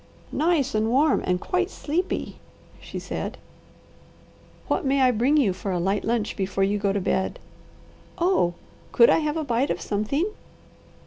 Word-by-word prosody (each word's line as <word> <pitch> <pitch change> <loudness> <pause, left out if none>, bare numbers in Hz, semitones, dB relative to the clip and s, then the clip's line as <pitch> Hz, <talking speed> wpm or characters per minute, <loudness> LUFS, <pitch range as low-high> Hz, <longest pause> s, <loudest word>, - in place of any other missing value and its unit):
"Nice 305 -4 +1
and 215 +1 +1
warm 275 +5 +3
and 180 0 +1
quite 365 - -1
sleepy," 345 0 -3 0.4
she - - -8
said. - - -5 1.3
"What - - 0
may 275 0 +2
I 255 -1 +5
bring 250 +6 +2
you 225 -11 +3
for 195 - -6
a 180 - 0
light 195 +4 0
lunch 225 -2 -1
before 195 0 -1
you 205 +2 +1
go 200 -1 +1
to 200 - 0
bed?" 190 0 -1 0.8
"Oh, 340 - +2 0.4
could 470 - +6
I - - +4
have 305 0 -1
a 315 - -1
bite 250 0 0
of - - -1
something?" 215 - -1
245 Hz, 165 wpm, -25 LUFS, 200-305 Hz, 1.3 s, could